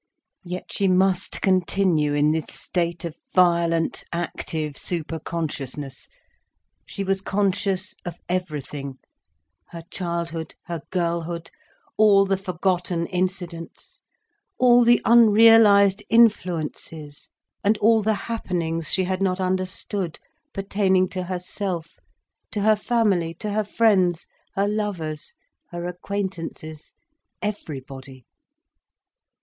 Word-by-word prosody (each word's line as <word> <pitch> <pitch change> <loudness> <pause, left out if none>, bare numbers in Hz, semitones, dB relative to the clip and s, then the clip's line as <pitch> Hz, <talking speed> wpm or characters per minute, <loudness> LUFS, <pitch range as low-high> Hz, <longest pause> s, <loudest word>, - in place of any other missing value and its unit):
Yet 180 0 -7
she 200 - +1
must 185 0 +1
continue 180 -5 +2
in 145 +1 +3
this 160 0 -1
state 170 -1 -3
of 165 -2 -5 0.2
violent 170 -2 +2
active 160 -2 -3
superconsciousness. 155 -4 -5 0.8
She 200 - -4
was 195 0 0
conscious 195 -1 -1
of 175 - -6
everything—her 140 - -7
childhood, 170 -2 -4
her 170 -3 -5
girlhood, 170 -1 -2 0.5
all 205 -2 +6
the 195 0 +1
forgotten 180 -2 -1
incidents, 180 -2 -4 0.6
all 245 -1 +6
the 240 0 +4
unrealised 220 -3 +6
influences 165 -9 +1 0.3
and 210 +2 +3
all 220 +1 +4
the 215 +1 +1
happenings 170 -8 -2
she 190 - +3
had 185 +1 -2
not 185 -1 +1
understood, 185 -1 -2 0.3
pertaining 195 -3 +1
to 185 - -4
herself, 180 - -4 0.5
to 210 - -3
her 215 +1 +5
family, 205 -7 +1
to 210 +4 -4
her 215 +1 +1
friends, 195 -5 +2 0.3
her 200 +1 +1
lovers, 190 -8 -3 0.3
her 175 0 -5
acquaintances, 175 -4 -5 0.5
everybody. 135 - -6
180 Hz, 100 wpm, -23 LUFS, 165-200 Hz, 0.8 s, all